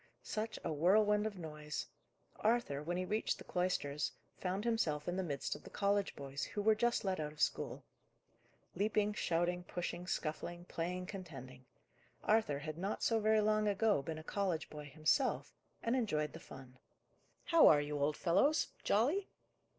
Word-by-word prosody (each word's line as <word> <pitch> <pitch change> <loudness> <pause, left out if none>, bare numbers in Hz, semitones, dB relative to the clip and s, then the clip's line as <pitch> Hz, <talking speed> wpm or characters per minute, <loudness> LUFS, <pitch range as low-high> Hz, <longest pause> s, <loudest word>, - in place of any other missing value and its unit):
Such 220 +1 -3
a 165 - -1
whirlwind 210 +6 +4
of 205 -3 -6
noise! 150 -3 -5 0.5
Arthur, 220 -11 +1
when 175 +4 -2
he 185 - -1
reached 215 +4 0
the - - -10
cloisters, 150 -5 -1 0.2
found 190 +3 -2
himself 160 -11 0
in 175 - -1
the 190 - 0
midst 145 -6 -2
of 145 - -9
the - - -10
college 200 0 +1
boys, 140 0 -5
who 205 - -3
were 220 +1 +6
just 235 0 +1
let 190 -2 0
out 150 -1 -2
of 150 - -16
school. - - 0 0.9
Leaping, 210 +2 +1
shouting, 175 -1 0
pushing, 175 0 -4
scuffling, 175 +1 -3
playing, 180 +2 -3
contending! 135 - -9 0.6
Arthur 215 -10 +3
had 155 +2 -6
not 195 +3 -2
so 225 -1 +3
very 215 0 +4
long 215 0 +2
ago 205 -4 +3
been 155 +3 -5
a 155 - -8
college 180 -3 -1
boy 150 -1 -7
himself, 155 - +1 0.3
and 230 +2 +1
enjoyed 155 - 0
the - - -8
fun. 130 -1 -12 0.6
"How 335 -2 +7
are 150 - +7
you, 145 0 -2
old 150 +1 +1
fellows 285 - +3
jolly?" 290 - +2
180 Hz, 165 wpm, -36 LUFS, 150-210 Hz, 0.9 s, How